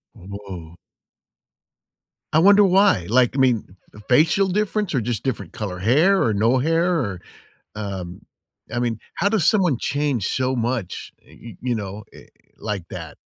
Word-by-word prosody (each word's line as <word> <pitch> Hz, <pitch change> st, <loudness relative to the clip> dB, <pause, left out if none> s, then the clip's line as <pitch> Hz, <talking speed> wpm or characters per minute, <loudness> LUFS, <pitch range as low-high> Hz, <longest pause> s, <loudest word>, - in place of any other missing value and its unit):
Woah. 95 Hz, -4 st, -9 dB, 1.6 s
I 160 Hz, -, +5 dB
wonder 200 Hz, +3 st, +6 dB
why? 190 Hz, -, +3 dB
Like, 125 Hz, +3 st, +2 dB
I -, -, +1 dB
mean, 115 Hz, -7 st, +1 dB, 0.2 s
f 105 Hz, -, -12 dB
facial 160 Hz, +9 st, +4 dB
difference, 210 Hz, -2 st, -1 dB
or 125 Hz, -, +1 dB
just 115 Hz, -1 st, -3 dB
different 130 Hz, -2 st, -4 dB
color 95 Hz, -4 st, -5 dB
hair, 155 Hz, -, +3 dB
or 110 Hz, -, +1 dB
no 115 Hz, +6 st, +2 dB
hair, 165 Hz, +6 st, +1 dB
or 100 Hz, -8 st, -4 dB, 0.5 s
um, 95 Hz, -4 st, -6 dB, 0.5 s
I 120 Hz, -, -1 dB
mean, 120 Hz, -2 st, -1 dB, 0.2 s
how 200 Hz, -, +1 dB
does 205 Hz, -7 st, +2 dB
someone 180 Hz, -, +1 dB
change 140 Hz, -7 st, -1 dB
so 130 Hz, 0 st, 0 dB
much, 120 Hz, -5 st, -3 dB
eh, -, -, -18 dB
y 115 Hz, -6 st, -10 dB
you 125 Hz, -1 st, -1 dB
know, 105 Hz, 0 st, -6 dB
eh, -, -, -15 dB, 0.3 s
like 105 Hz, -5 st, -4 dB
that? 80 Hz, -4 st, -8 dB
120 Hz, 160 wpm, -22 LUFS, 100-160 Hz, 1.6 s, wonder